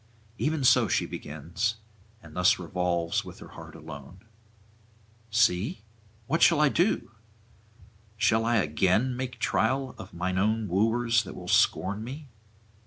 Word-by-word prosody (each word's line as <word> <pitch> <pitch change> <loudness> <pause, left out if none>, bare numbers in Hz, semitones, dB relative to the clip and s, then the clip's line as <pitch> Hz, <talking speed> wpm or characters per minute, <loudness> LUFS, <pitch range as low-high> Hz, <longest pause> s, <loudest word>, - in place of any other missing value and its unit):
Even 150 -1 0
so 125 - +5
she - - +1
begins, 85 +9 -4 0.5
and 80 -2 -14
thus 90 +3 +4
revolves 90 -2 -1
with - - -11
her - - -12
heart - - -12
alone: 80 +3 -11 1.1
'See, 105 -1 +1 0.4
what 160 +7 -1
do - - +6
I? 150 -2 +4 1.5
Shall 110 +1 +2
I 115 +1 +1
again 100 +7 +1
make 130 0 -5
trial 130 +2 0
of 95 - -9
mine 90 +1 -2
old 110 +1 0
wooers 115 +4 +2
that 100 - -9
will - - -9
scorn 100 +6 +2
me? 140 +4 -8
105 Hz, 130 wpm, -27 LUFS, 90-120 Hz, 1.5 s, do